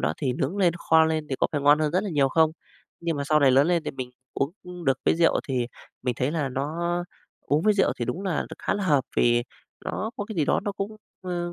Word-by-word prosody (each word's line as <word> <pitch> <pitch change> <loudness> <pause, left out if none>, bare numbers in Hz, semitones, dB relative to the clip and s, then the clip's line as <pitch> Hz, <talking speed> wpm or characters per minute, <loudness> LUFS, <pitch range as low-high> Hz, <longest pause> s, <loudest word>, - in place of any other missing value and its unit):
đó 75 +4 +1
thì 130 -3 -1
nướng 135 +9 -2
lên, 180 -4 +3
kho 160 -1 +4
lên 160 -1 -1
thì 135 - -2
có - - +2
phải 145 - 0
ngon 145 +2 +5
hơn 155 -1 +1
rất 185 - +2
là 200 - -3
nhiều 140 -3 +3
không? 160 +3 +4 0.5
Nhưng 170 -3 -1
mà 140 - -2
sau 150 +1 +3
này 135 - +6
lớn 135 +4 +5
lên 170 -3 +1
thì - - -2
mình 130 -2 -6 0.2
uống 140 +4 -1 0.3
được 135 -1 +2
cái - - +4
rượu 170 -1 +3
thì 125 -2 0 0.4
mình 125 -1 0
thấy 130 +3 +1
là 150 -4 -1
nó 140 +4 -3 0.7
uống 150 +3 0
với 215 -1 +4
rượu 195 - +3
thì 120 - -1
đúng 180 - -3
là 185 -6 0
đ - - -11
khá - - -1
là 205 -1 -2
hợp 145 -7 +3
vì 120 0 +4 0.4
nó 220 - -3
có 205 - -3
cái 215 -3 -8
gì 155 - +2
đó - - +2
nó 205 0 -3
cũng, 200 +2 -5 0.3
ơ, 175 -1 -3
155 Hz, 265 wpm, -25 LUFS, 135-175 Hz, 0.7 s, này